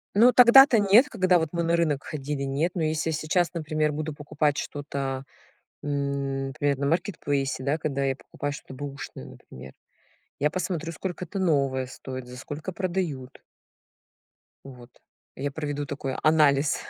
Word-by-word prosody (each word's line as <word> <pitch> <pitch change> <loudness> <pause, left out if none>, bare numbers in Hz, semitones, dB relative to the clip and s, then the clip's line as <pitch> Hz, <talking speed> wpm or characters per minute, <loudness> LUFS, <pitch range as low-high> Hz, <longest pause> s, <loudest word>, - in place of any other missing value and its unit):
Ну, 240 +4 +6
тогда-то, 250 0 +8
нет, 205 +7 +6
когда 185 -4 +3
вот 160 -2 -2
мы 170 - 0
на 170 0 +2
рынок 150 -5 0
ходили, 145 -1 -4
нет, 140 +6 0
но 170 - -1
если 155 +1 0
сейчас, 160 +4 0
например, 155 -2 -1
буду 155 +1 -3
покупать 145 0 -1
что-то, 140 -2 -4 0.6
м, 140 -1 -2
например, 145 0 0
на 140 - -1
маркетплейсе, 145 -6 -1
да, 145 +3 0
когда 140 -3 -2
я 135 -1 +1
покупаю 145 +1 -6
что-то 135 - -9
бэушное, 140 - -7
например, 65 +1 -12 0.7
я 150 +2 +2
посмотрю, 170 -2 -3
сколько 180 +2 -5
это 195 - -7
новое 140 -7 +1
стоит, 130 0 -8
за 125 - -10
сколько 145 +7 -6
продают. 170 -8 -3 1.2
Вот. 125 -2 -12 0.5
Я 140 +1 -3
проведу 145 -1 -3
такой 140 -1 -4
анализ. 150 -2 +3
145 Hz, 150 wpm, -26 LUFS, 140-170 Hz, 1.2 s, тогда-то